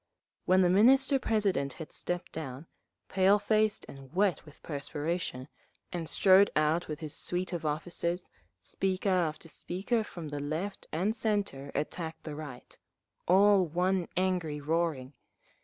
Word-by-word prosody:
When 185 +1 +5
the 175 - +4
Minister 265 +7 +5
President 195 - 0
had 160 - -9
stepped 175 0 -3
down, 140 -2 -6 0.4
pale 195 +2 +4
faced 215 0 +1
and 135 -1 -12
wet 190 +1 +1
with 150 - -16
perspiration, 145 -2 -3 0.5
and 165 -3 -3
strode 195 +3 +6
out 155 +3 +2
with 155 +2 -6
his 155 -2 -3
suite 180 +1 -3
of 165 -2 -2
officers, 170 +3 -2 0.3
speaker 190 +1 -1
after 165 -3 0
speaker 195 +8 -2
from 170 -7 -8
the 145 0 -4
Left 160 +8 -4
and 190 +8 0
Centre 200 - -1
attacked 160 +2 -4
the 155 - -6
Right, 145 -5 -9 0.5
all 195 0 +5
one 180 +2 0
angry 180 -5 0
roaring. 150 -3 -1
175 Hz, 140 wpm, -30 LUFS, 150-195 Hz, 0.5 s, strode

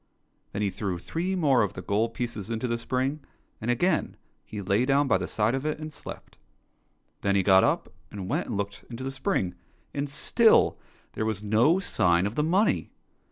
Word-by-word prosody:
Then 105 - -2
he 100 - 0
threw 95 -3 -3
three 175 - -3
more 140 -8 +3
of 100 -4 -1
the 95 - -5
gold 115 +3 0
pieces 115 -4 -4
into 115 +2 -2
the 115 -1 -1
spring, 130 +5 -1 0.4
and 115 - -3
again 165 +7 +1 0.3
he 105 - -7
lay 100 +4 +1
down 140 +2 +3
by - - +3
the - - -3
side 110 +2 +1
of 135 0 -2
it 155 0 -1
and 155 0 -7
slept. - - -10 0.8
Then 100 0 +1
he 95 - +3
got 95 0 +6
up - - 0 0.2
and 95 -3 -6
went - - -1
and 110 - -3
looked 100 0 -4
into 120 +1 -7
the 135 - -3
spring, 100 -8 -1 0.4
and 140 0 -2
still 220 - +4 0.3
there - - -2
was 105 -2 -2
no 115 - +4
sign 90 - +2
of 105 - -2
the 150 - 0
money. 185 +8 +2
115 Hz, 200 wpm, -27 LUFS, 100-145 Hz, 0.8 s, got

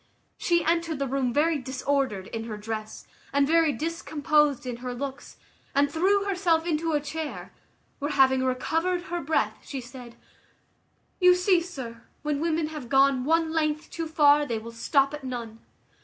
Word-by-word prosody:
She 340 -1 +2
entered 335 -1 +1
the 275 - -1
room 260 -1 0
very 305 +4 +2
disordered 260 -5 -1
in 225 +2 -5
her 215 -2 -5
dress, 215 0 -6 0.3
and 280 0 +3
very 325 +1 +4
discomposed 300 -1 0
in 245 -2 -4
her 250 0 -5
looks, 270 +2 -6 0.4
and 285 0 +3
threw 385 +6 +2
herself 360 -5 +1
into 325 -1 0
a 295 - +3
chair, 300 +1 -6 0.5
where, 290 - -2
having 265 -2 +4
recovered 325 +8 0
her 345 -1 -4
breath, 315 +2 0
she 275 - -6
said 245 -1 -11 1.0
"You 360 -1 +7
see, 360 -1 +3
sir, 260 -10 -7 0.2
when 295 -1 -1
women 320 -1 0
have 300 -6 -8
gone 270 -1 +4
one 325 +1 +2
length 305 -1 -1
too 330 -1 -4
far, 295 -2 +5
they 235 -6 -2
will 225 +1 -8
stop 275 +4 +1
at 295 -1 -6
none. 235 -3 -6
290 Hz, 165 wpm, -26 LUFS, 255-325 Hz, 1.0 s, You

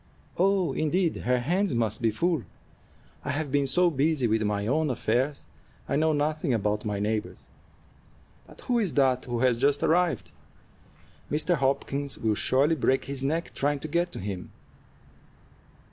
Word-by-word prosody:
"Oh, 185 -5 +2
indeed! 165 +4 +1
Her 125 +1 +1
hands 175 +5 0
must 110 -2 -1
be 115 - +3
full. 165 +7 0 0.8
I - - -4
have 145 0 -2
been 140 0 +2
so 175 +6 +3
busy 145 -1 +1
with 110 -1 +1
my 105 -1 -1
own 150 +6 +1
affairs, 130 +3 -1 0.4
I - - -1
know 160 +2 +3
nothing 150 -2 0
about 105 0 -1
my 105 -1 -1
neighbors'. 105 +1 -3 1.0
But - - -15
who 245 -1 0
is 200 -7 -1
that 130 -3 +2
who 120 -1 -3
has 125 -3 +3
just 140 +2 +2
arrived? 175 +1 +1 1.0
Mr. 155 +4 +2
Hopkins 140 0 -1
will 110 -1 0
surely 135 +8 +2
break 135 -3 +1
his 135 -1 -4
neck 160 +5 -1
trying 145 +1 0
to - - -4
get 170 +3 0
to - - -6
him." 95 -2 -5
140 Hz, 160 wpm, -27 LUFS, 120-160 Hz, 1.0 s, be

